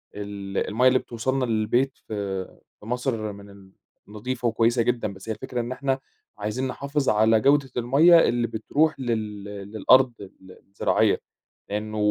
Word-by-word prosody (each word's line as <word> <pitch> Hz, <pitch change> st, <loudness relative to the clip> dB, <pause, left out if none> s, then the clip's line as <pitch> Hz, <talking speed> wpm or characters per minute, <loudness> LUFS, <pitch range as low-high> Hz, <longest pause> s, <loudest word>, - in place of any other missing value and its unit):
ال 100 Hz, -1 st, -6 dB
المَيّة 125 Hz, +4 st, +3 dB
اللي 130 Hz, 0 st, +4 dB
بتوصلنا 130 Hz, +3 st, -2 dB
للبيت 120 Hz, +4 st, 0 dB
في 100 Hz, -3 st, -3 dB, 0.3 s
في 105 Hz, -, -15 dB
مصر 120 Hz, -3 st, -2 dB
من 100 Hz, 0 st, -13 dB
ال 100 Hz, -1 st, -16 dB, 0.4 s
نضيفة 120 Hz, +4 st, -3 dB
وكويسة 115 Hz, +1 st, +2 dB
جدًا، 115 Hz, -4 st, -1 dB
بس 95 Hz, +3 st, -11 dB
هي -, -, 0 dB
الفكرة 125 Hz, -2 st, -4 dB
إن 120 Hz, +2 st, -5 dB
إحنا 135 Hz, 0 st, -1 dB, 0.4 s
عايزين 105 Hz, +6 st, -2 dB
نحافظ 140 Hz, +2 st, -2 dB
على 110 Hz, +1 st, +4 dB
جودة 140 Hz, +1 st, +3 dB
المَيّة 145 Hz, +8 st, +6 dB
اللي 120 Hz, 0 st, 0 dB
بتروح 145 Hz, +7 st, 0 dB
لل 110 Hz, -5 st, -3 dB
للأرض 105 Hz, +5 st, +2 dB
ال 95 Hz, -1 st, -13 dB, 0.2 s
الزراعية. 100 Hz, -, +1 dB, 0.5 s
لأنه 105 Hz, +1 st, -4 dB
115 Hz, 150 wpm, -25 LUFS, 105-130 Hz, 0.5 s, المَيّة